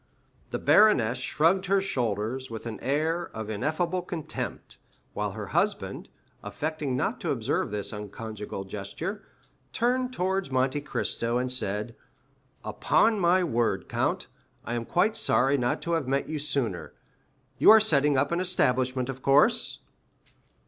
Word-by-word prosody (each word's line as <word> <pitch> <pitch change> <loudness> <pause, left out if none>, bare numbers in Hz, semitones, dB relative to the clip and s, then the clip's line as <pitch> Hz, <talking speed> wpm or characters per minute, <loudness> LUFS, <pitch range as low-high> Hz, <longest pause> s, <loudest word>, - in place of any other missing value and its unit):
The - - -2
baroness 125 - +4
shrugged 165 +8 +1
her 195 +1 +3
shoulders 125 - -2
with 115 0 -7
an 115 -2 -5
air 160 +5 -1
of 110 -1 -5
ineffable 165 - -1
contempt, 170 -3 -6 0.4
while - - -3
her - - -6
husband, - - -1 0.3
affecting 150 -4 -3
not - - -2
to - - -2
observe - - -1
this 105 0 -4
unconjugal 105 -1 -6
gesture, 130 - -5 0.5
turned 250 +2 +1
towards 190 - -1
Monte 130 +2 0
Cristo 120 -4 -2
and 125 0 -1
said,—"Upon 115 - -2
my 180 +1 +3
word, 115 - 0
count, - - -1 0.4
I 120 - -3
am 120 -1 -2
quite 200 - +1
sorry 135 - +4
not 125 -3 -1
to 170 - -3
have 160 -5 0
met 135 +1 0
you 155 -1 -3
sooner. 135 - -2 0.7
You - - +6
are 220 +1 +10
setting 150 -9 +3
up 140 +3 +1
an 170 - 0
establishment, 130 -8 +1
of 135 -1 -6
course?" 140 +2 +3
135 Hz, 140 wpm, -27 LUFS, 115-175 Hz, 0.7 s, are